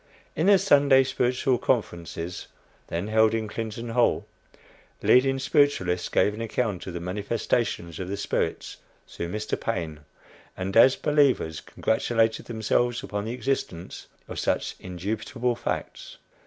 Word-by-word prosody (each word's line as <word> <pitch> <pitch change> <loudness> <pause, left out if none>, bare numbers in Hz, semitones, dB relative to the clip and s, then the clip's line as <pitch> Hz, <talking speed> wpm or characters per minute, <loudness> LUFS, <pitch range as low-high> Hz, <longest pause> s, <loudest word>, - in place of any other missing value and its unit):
In 160 +5 +1
the 200 -1 +7
Sunday 140 -8 +5
Spiritual 125 -1 0
Conferences, 85 -8 -2 0.4
then 85 +4 -3
held 110 0 +4
in 110 -1 -2
Clinton 115 +2 -5
Hall, 120 +1 +2 0.8
leading 135 +1 +4
spiritualists 130 - +1
gave 105 - +2
an 110 - -6
account 110 -5 -2
of 90 - -6
the - - -3
"manifestations 100 -1 -2
of 95 - -4
the 100 - -3
spirits" 100 - -2 0.3
through 85 - -5
Mr. 105 +3 -3
Paine, 85 -9 -3 0.6
and, 95 +1 -3
as 130 +3 +7
believers, 140 - +2
congratulated 110 0 0
themselves 120 +1 0
upon 105 0 -4
the 115 - -3
existence 125 -9 -3 0.2
of - - -6
such - - -1
"indubitable 110 +7 -3
facts." - - -5
110 Hz, 130 wpm, -26 LUFS, 95-125 Hz, 0.8 s, the